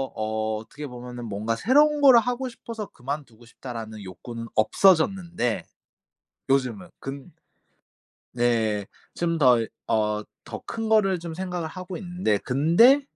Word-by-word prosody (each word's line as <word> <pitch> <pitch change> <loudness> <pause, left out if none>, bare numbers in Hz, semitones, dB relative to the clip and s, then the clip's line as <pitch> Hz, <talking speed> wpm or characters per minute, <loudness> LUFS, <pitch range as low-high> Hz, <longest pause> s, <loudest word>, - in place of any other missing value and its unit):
어 110 0 -1
어떻게 110 +7 -8
보면은 125 -1 -8
뭔가 110 +2 -2
'새로운 295 - +4
거를 265 -4 +8
하고 250 +2 -2
싶어서 230 -3 -7
그만두고 130 -3 -7
싶다.'라는 115 -3 -8
욕구는 115 +5 -8
없어졌는데 170 - +2 0.9
요즘은. 130 -6 0
근 135 0 -7 1.0
네. 115 -4 +1 0.3
좀 170 -1 0
더 125 -4 +6
이 115 - -2 0.2
어 105 -1 +1 0.2
더 - - -7
큰 225 -1 -4
거를 195 -4 +3
좀 170 -1 -6
생각을 180 -1 -3
하고 185 +2 -7
있는데 175 - -1
근데 170 - +5
135 Hz, 270 characters per minute, -25 LUFS, 115-185 Hz, 1.0 s, 거를